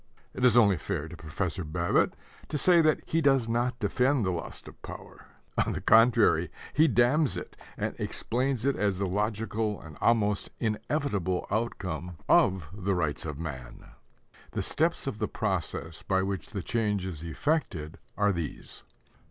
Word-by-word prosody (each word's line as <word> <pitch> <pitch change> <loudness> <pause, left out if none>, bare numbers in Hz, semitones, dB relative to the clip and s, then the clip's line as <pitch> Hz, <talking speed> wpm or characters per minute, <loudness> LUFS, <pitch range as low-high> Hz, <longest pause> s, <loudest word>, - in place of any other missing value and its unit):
It 125 - -4
is 125 -2 +6
only 100 -6 +6
fair 80 -2 -3
to - - -9
Professor 85 +3 -3
Babbitt 85 +2 +1 0.3
to 150 - -1
say 175 +3 +6
that 155 -1 +3
he 165 - +1
does 135 -5 +3
not 120 +2 0
defend 125 +3 +1
the 95 - +1
lust 85 -2 -6
of - - -13
power. - - -10 0.4
On - - -2
the - - -3
contrary, 110 -7 +5 0.2
he 155 +2 +5
damns 135 +3 +3
it, - - -7 0.2
and - - -2
explains 130 0 -1
it 140 - +2
as 100 -3 0
the 100 - 0
logical 105 +2 -1
and 80 -2 -12
almost 105 -3 +2
inevitable 105 - -1
outcome 95 -6 -3
of 95 -5 +4
the 100 -1 -1
rights 80 -2 -1
of 75 -3 -5
man! 70 -6 -7 0.6
The - - -1
steps 165 +2 0
of 120 -6 -4
the 105 - 0
process 90 -5 -3
by 95 0 +1
which 95 -1 -3
the 100 -5 -4
change 105 -4 0
is 85 -5 -5
effected 85 - -2 0.2
are 105 0 +3
these. 85 -5 -5
105 Hz, 160 wpm, -29 LUFS, 90-120 Hz, 0.6 s, is